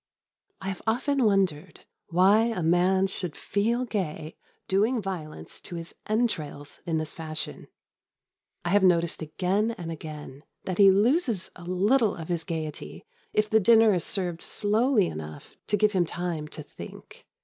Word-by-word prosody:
I 190 - -3
have 190 - -5
often 260 +4 +1
wondered 185 -5 +1 0.3
why 195 +6 +5
a 225 -7 -1
man 180 +3 +3
should 180 -4 -4
feel 230 +5 0
gay 165 -8 -4 0.3
doing 215 +6 +2
violence 160 - -6
to 175 - -9
his 165 0 -7
entrails 165 -11 -2
in 165 -1 +1
this 155 -1 -3
fashion. 155 -1 -5 1.0
I - - 0
have 205 +3 +4
noticed 170 -3 +3
again 195 +8 0
and 165 -2 -5
again 150 -3 -8 0.2
that 185 0 -4
he 200 -1 +9
loses 225 - +2
a 175 - -11
little 205 +5 +2
of 165 0 -8
his 170 -2 -1
gaiety 160 -4 -5 0.3
if 215 0 +2
the 220 +1 +4
dinner 225 +1 +6
is 175 -3 0
served 175 -4 -3
slowly 215 +1 +2
enough 75 - -7
to 210 - +2
give 210 +1 +3
him 185 -4 +2
time 170 -3 -3
to - - -8
think. - - -12
185 Hz, 155 wpm, -27 LUFS, 165-215 Hz, 1.0 s, he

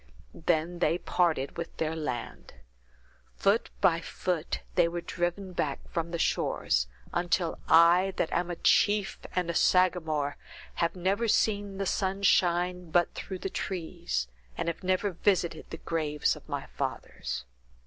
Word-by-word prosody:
Then 170 +1 0
they 170 - +2
parted 165 -7 0
with 170 0 -6
their 160 0 -1
land. 125 -7 -5 0.8
Foot 205 +4 +2
by 165 -1 +4
foot, 170 -1 -2
they 175 -2 +4
were 170 +1 -3
driven 175 +2 -3
back 145 -5 -2
from 165 -1 -2
the 170 - -3
shores, - - +1 0.3
until 175 -1 0
I, 170 +4 +6
that 160 - 0
am 175 0 0
a 175 - -2
chief 205 +3 +3 0.2
and 180 -2 +1
a 170 - -1
Sagamore, 160 -6 +2 0.4
have 170 +1 +1
never 195 +6 0
seen 205 -2 +1
the 195 - -1
sun 195 +1 -1
shine 180 -1 +2
but 175 +1 +2
through 190 - -5
the 190 - -4
trees, 170 - -3 0.3
and - - -2
have 170 +3 -3
never 185 +2 +1
visited 175 -2 0
the 160 - -6
graves 155 -3 0
of - - -14
my - - -3
fathers." - - -4
175 Hz, 150 wpm, -29 LUFS, 165-185 Hz, 0.8 s, I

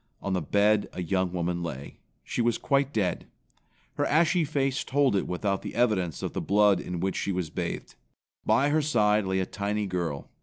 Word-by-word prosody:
On 100 - -3
the 90 - 0
bed 105 +6 +2
a 90 - -4
young 95 +1 0
woman 85 -1 -2
lay. 70 -5 -6 0.3
She - - -2
was 120 0 +2
quite 140 -1 +1
dead. 100 -7 -1 0.7
Her - - +1
ashy 165 +3 +3
face 140 -2 0
told 135 -4 +2
it 95 - 0
without 100 +2 -1
the - - -7
evidence 100 - +1
of - - -3
the - - -2
blood 100 -2 +4
in 90 -1 -5
which 95 +1 -1
she 100 - -1
was 90 -4 -3
bathed. - - -4 0.5
By 140 +2 +3
her 155 +1 +2
side 105 -8 +2
lay 95 0 0
a 95 - 0
tiny 105 +2 -2
girl. 85 -6 -3
100 Hz, 195 wpm, -27 LUFS, 90-125 Hz, 0.7 s, blood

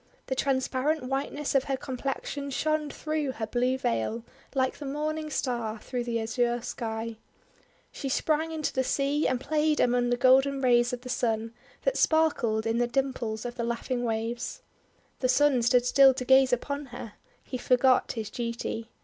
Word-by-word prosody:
The - - -2
transparent 270 +2 0
whiteness 275 +2 -2
of 270 -1 +3
her 270 -1 -1
complexion 275 +2 -4
shone 305 +2 0
through 305 -2 -2
her 225 - -3
blue 250 +3 0
veil 220 - -1 0.3
like 260 0 0
the 295 - -6
Morning 305 +2 -2
Star 235 -6 -2
through 245 +2 -4
the 230 -1 -1
azure 240 +2 0
Sky 225 -2 -4 0.7
She 275 - -5
sprang 310 +4 0
into 315 -2 -2
the 260 - +1
sea, 280 +3 +1
and 255 - 0
played 305 +2 +1
among 245 0 +2
the 245 - +1
golden 270 +2 +4
rays 240 -2 +3
of 250 -1 -4
the 250 - -9
Sun, 225 -2 -1 0.3
that - - +1
sparkled 270 -9 +2
in 225 +1 +1
the 240 - +2
dimples 240 -4 -2
of 240 - -3
the 235 - -1
laughing 235 +1 -2
waves. 235 - -3 0.6
The 255 - +1
Sun 275 -1 +4
stood 245 +1 +3
still 270 +1 +6
to 255 - -4
gaze 265 0 +5
upon 280 +3 -2
her. 240 -3 -8 0.3
He 255 - -5
forgot 255 +1 +3
his 220 -3 -5
duty. 235 -1 -4
255 Hz, 170 wpm, -28 LUFS, 235-280 Hz, 0.7 s, still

